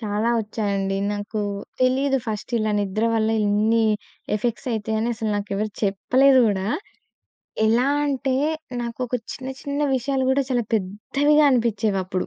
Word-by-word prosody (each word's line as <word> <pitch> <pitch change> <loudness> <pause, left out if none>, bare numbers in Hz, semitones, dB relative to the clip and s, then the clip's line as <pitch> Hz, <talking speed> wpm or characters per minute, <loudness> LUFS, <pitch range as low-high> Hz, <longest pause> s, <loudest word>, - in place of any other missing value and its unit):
చాలా 215 +1 0
వచ్చాయండి. 200 -2 -2 0.2
నాకు 205 +1 -4 0.4
తెలీదు 265 +2 +2
ఫస్ట్ 215 +2 -4
ఇలా 215 -1 0
నిద్ర 205 +2 -1
వల్ల 220 0 +2 0.2
ఇన్ని 215 +2 +2 0.5
ఎఫెక్ట్స్ 235 +4 -2
అయితయని 220 +1 -1
అసలు 220 -1 -2
నాకెవరు 205 +1 -2
చెప్పలేదు 260 +7 +4
గూడా. 195 -2 0 1.0
ఎలా 235 +4 +3 0.2
అంటే 270 -2 0 0.5
నాకు 235 -1 -5
ఒక 245 - -4 0.2
చిన్న 260 -1 -7
చిన్న 285 0 -3
విషయాలు 265 +1 0
గూడా 270 +1 +3
చాలా 245 -2 +2
పెద్దవిగా 275 +10 +2
అనిపించేవప్పుడు. 210 -6 0
220 Hz, 125 wpm, -23 LUFS, 205-255 Hz, 1.0 s, చెప్పలేదు